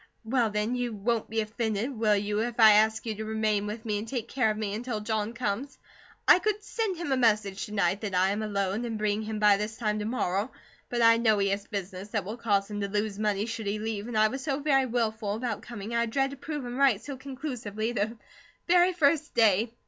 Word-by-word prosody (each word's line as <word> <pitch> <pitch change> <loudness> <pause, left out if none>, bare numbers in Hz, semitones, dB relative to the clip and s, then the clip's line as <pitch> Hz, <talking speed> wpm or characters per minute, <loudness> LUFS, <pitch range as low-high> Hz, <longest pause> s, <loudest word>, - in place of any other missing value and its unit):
"Well, 235 -1 +2
then, 210 +3 -1
you 245 -2 -2
won't 220 +2 -1
be 225 +1 0
offended, 220 +2 -2
will 215 -2 +3
you, 205 +1 -1
if 240 +1 -3
I 220 -1 +9
ask 220 +2 +3
you 225 - -2
to 215 +1 -6
remain 215 -1 0
with 220 +2 -6
me 210 -2 -1
and 215 - -6
take 235 -1 -3
care 250 -5 +1
of 215 - -1
me 210 -2 -3
until 230 0 -3
John 215 0 -2
comes? 240 +3 -3 0.5
I 360 - +8
could 420 +2 -1
send 425 -4 -2
him 335 -4 -4
a 265 - +3
message 210 -5 +1
to - - -11
night 195 -1 +1
that 200 -4 -3
I 185 +1 +3
am 205 +2 -2
alone, 200 0 -1
and 230 -2 -3
bring 210 0 0
him 220 0 -4
by 210 -1 +5
this 215 +2 -4
time 215 -2 -1
to 210 - -3
morrow; 210 -1 -1 0.4
but 240 -1 0
I 230 0 +7
know 220 -2 +3
he 200 0 +1
has 200 +1 -2
business 195 -2 -5
that 210 -3 -2
will 215 +4 -5
cause 205 -3 0
him 205 0 -3
to 200 - -1
lose 205 0 -2
money 210 -1 0
should 225 -2 -5
he 205 +1 -1
leave, 215 0 -4
and 240 -2 -3
I 215 0 +5
was 265 +2 -5
so 275 -2 -1
wilful 240 -7 0
about 225 -2 -3
coming, 230 -1 -7
I 235 0 +1
dread 270 +4 0
to - - -7
prove 285 0 -5
him 245 +1 -5
right 270 -7 +4
so 275 +5 -7
conclusively 255 -5 -4
the 225 0 -2 0.5
very 360 +1 +4
first 310 -2 +2
day. 220 -1 +4
220 Hz, 240 wpm, -28 LUFS, 210-245 Hz, 0.5 s, I